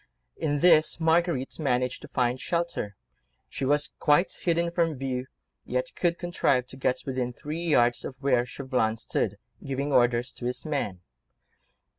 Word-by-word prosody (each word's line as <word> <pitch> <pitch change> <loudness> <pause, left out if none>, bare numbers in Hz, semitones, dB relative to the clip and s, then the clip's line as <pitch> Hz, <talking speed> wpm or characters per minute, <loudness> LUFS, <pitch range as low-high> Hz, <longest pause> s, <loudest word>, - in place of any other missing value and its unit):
In 145 -2 -1
this 160 -2 +5
Marguerite 165 -4 +1
managed 125 -4 0
to - - -9
find 125 0 0
shelter; 170 - -2 0.5
she 135 - -4
was 145 +2 +2
quite 155 +4 +4
hidden 170 0 0
from 170 -2 +1
view, 130 -1 -3 0.4
yet - - -2
could 175 -1 +1
contrive 140 -7 +1
to - - -10
get 130 -1 -1
within 130 -2 -2
three 155 +6 -5
yards 120 -7 +3
of 130 - -6
where 130 -3 +3
Chauvelin 125 -3 -1
stood, - - -1 0.3
giving 140 +1 -2
orders 120 0 +3
to 120 - -8
his 125 +3 -3
men. 135 - -2
140 Hz, 150 wpm, -27 LUFS, 125-165 Hz, 0.5 s, this